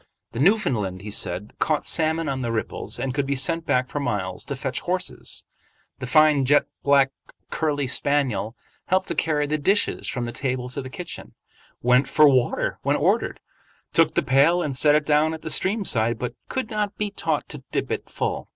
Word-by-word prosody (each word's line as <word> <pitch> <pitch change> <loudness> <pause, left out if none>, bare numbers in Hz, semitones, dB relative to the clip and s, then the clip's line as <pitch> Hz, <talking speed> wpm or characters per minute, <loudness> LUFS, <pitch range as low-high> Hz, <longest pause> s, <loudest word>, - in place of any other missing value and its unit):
The 115 - -6
Newfoundland, 120 - +1
he 105 - -6
said, 95 +1 -3
caught 155 -2 +1
salmon 160 0 +1
on 135 -2 -2
the 120 -2 -2
ripples, 110 -1 -3
and 135 -2 -2
could 140 0 -1
be 140 - 0
sent 165 +5 0
back 125 0 +2
for 145 - -4
miles 100 -9 -2
to - - -4
fetch - - -3
horses. - - -3 0.5
The 130 - -5
fine 155 +1 +5
jet 145 +3 +4 0.2
black 140 -1 +4 0.4
curly 145 -3 0
spaniel 130 -5 0 0.3
helped 185 +1 +1
to - - 0
carry 150 -2 +1
the 155 +1 -1
dishes 195 +8 +1
from 125 -3 -2
the 120 - -4
table 125 0 -2
to 135 +3 -5
the 130 - -8
kitchen, 175 +6 -8 0.5
went 125 +2 +4
for 150 +2 +5
water 130 -3 +1
when - - +1
ordered, - - 0 0.5
took - - +3
the - - +2
pail 145 +7 +4
and 140 -3 -3
set 145 +3 +5
it 150 -1 +2
down 155 +2 +2
at 160 - -12
the 160 - -3
stream 200 +5 0
side, 115 -5 +1
but 120 0 -4 0.2
could 260 -4 -3
not 210 -2 -2
be 210 -1 -2
taught - - -2
to - - -6
dip - - -2
it - - -3
full. - - -3
140 Hz, 195 wpm, -24 LUFS, 125-160 Hz, 0.5 s, fine